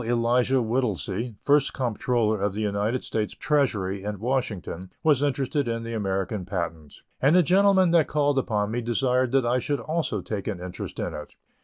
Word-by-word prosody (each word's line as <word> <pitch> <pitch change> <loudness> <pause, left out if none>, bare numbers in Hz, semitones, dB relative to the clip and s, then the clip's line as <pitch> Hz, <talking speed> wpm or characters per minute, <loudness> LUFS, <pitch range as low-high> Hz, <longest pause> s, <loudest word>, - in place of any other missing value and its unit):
Elisha 120 +2 +2
Whittlesey, 115 -1 -2
First 145 -1 +3
Comptroller 115 -3 0
of 100 -1 0
the 110 - -2
United 105 +4 -1
States 105 -2 -2
Treasury 105 -10 0
at 105 0 -4
Washington, 105 -6 -3
was 150 -4 +4
interested 140 -1 0
in 115 0 -2
the 115 0 -5
American 95 -1 -2
patent, 85 -5 -5 0.3
and 145 +5 +4
the 180 - +6
gentleman 190 +1 +4
that 170 -3 +4
called 145 -2 +2
upon 105 -4 -1
me 120 +2 -1
desired 125 +2 +1
that 135 -2 +3
I 125 +2 +2
should 145 +2 -2
also 155 - -2
take 100 -1 -5
an 100 -4 -3
interest 90 0 -7
in - - -3
it. 75 - -8
120 Hz, 175 wpm, -25 LUFS, 105-135 Hz, 0.3 s, the